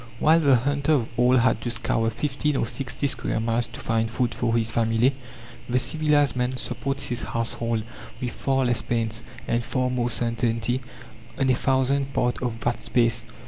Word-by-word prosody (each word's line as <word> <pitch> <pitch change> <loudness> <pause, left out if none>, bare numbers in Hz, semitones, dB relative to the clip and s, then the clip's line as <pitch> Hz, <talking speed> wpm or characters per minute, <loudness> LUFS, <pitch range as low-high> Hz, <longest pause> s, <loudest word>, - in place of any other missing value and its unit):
While 160 +6 +5
the 140 -5 +5
hunter 140 +4 +1
of 125 -7 +1
old 125 +2 +4
had 120 -2 +2
to 120 - -3
scour 115 -1 0
fifty 140 +5 -1
or - - +1
sixty 135 +3 -3
square 135 - -1
miles 115 +1 0
to - - -9
find 115 0 0
food 120 +1 -1
for 115 -1 0
his 115 -1 +1
family, 115 +3 +2 0.6
the 125 - +2
civilized 145 -1 +2
man 125 +1 -1
supports 135 +2 -2
his 120 -1 -1
household, 115 -1 -2 0.4
with 125 -1 -3
far 135 +1 0
less 120 -2 +1
pains, 115 -1 -2 0.2
and 120 0 0
far 125 +1 -1
more 120 -1 0
certainty, 120 +1 -1 0.6
on 135 -1 +2
a - - +5
thousandth 135 +2 +1
part 125 0 0
of 115 -3 -3
that 120 +2 -1
space. 115 -1 +1
120 Hz, 180 wpm, -25 LUFS, 115-135 Hz, 0.6 s, While